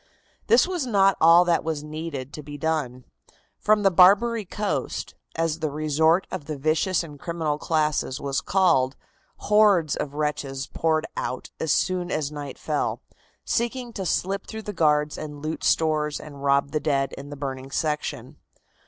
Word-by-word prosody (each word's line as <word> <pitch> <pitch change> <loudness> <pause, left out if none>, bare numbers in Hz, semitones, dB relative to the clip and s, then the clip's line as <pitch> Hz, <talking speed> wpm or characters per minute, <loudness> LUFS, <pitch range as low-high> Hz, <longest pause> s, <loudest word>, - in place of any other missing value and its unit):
This 240 +6 +5
was 355 -8 -2
not 195 -4 +4
all 170 +2 +7
that 170 -1 +2
was 155 -2 -3
needed 150 -3 -6
to 150 - -6
be 145 0 -9
done. 145 -5 -2 0.5
From 210 0 +3
the 195 - +5
"Barbary 205 +5 +5
Coast," 205 +2 -3 0.2
as 165 -1 -1
the 155 -1 -1
resort 155 +4 +2
of 145 - -5
the 155 -1 -5
vicious 155 +5 +1
and 150 -3 -11
criminal 160 -3 -2
classes 150 -5 0
was 140 -1 -1
called, 165 -9 +2 0.4
hordes 205 -8 +3
of 140 0 -4
wretches 145 -3 -2
poured 160 0 0
out 130 - -4
as 160 - 0
soon 180 +2 +1
as 150 -3 -2
night 145 -3 -7
fell, 150 -2 -2 0.4
seeking 240 0 -2
to 195 - -4
slip 195 +5 -1
through 220 -1 -7
the 210 - -5
guards 150 -3 +2
and 150 -1 -8
loot 155 +1 -4
stores 155 -2 +1
and 145 -2 -10
rob 140 0 +2
the 155 - 0
dead 140 -3 0
in 140 +1 -9
the 145 - -8
burning 135 -1 -5
section. 150 +1 -3
155 Hz, 165 wpm, -25 LUFS, 145-180 Hz, 0.5 s, all